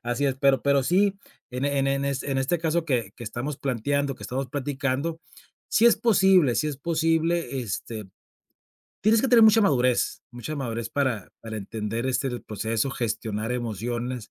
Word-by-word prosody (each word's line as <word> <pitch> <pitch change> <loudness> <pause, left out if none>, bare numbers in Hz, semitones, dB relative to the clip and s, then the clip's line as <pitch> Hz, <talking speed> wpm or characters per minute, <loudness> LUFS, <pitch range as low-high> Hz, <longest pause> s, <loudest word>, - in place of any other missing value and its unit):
Así 120 +4 -1
es, 135 - +1
pero 135 -1 +3
pero 140 -1 +3
sí, 195 +7 +2 0.4
en 125 +2 -3
e 140 -1 0
en 135 - +1
e 135 - +2
en 140 0 -2
este 140 0 -2
en 135 - 0
este 135 +6 0
caso 165 +1 0
que 120 -9 -1
que 120 - -8
estamos 120 +6 -4
planteando, 140 +2 -1
que - - -14
estamos 130 +1 -3
platicando, 140 +3 -2 0.5
si 230 - +5
es 235 - +6
posible 190 - +4
si 150 - +1
es 145 - -4
posible, 165 -1 0
este, 110 -1 -5 1.0
tienes 220 +2 +4
que 270 - +1
tener 235 -2 +6
mucha 220 +1 +6
madurez 125 - +2
mucha 120 +5 -6
madurez 115 -4 -3
para 130 -8 -1
para 110 -1 -6
entender, 110 +3 -4
este, 130 +1 0
el 120 -2 -5
proceso, 110 +4 -2
gestionar 115 -2 -3
emociones 120 +1 -4
135 Hz, 180 wpm, -25 LUFS, 120-155 Hz, 1.0 s, es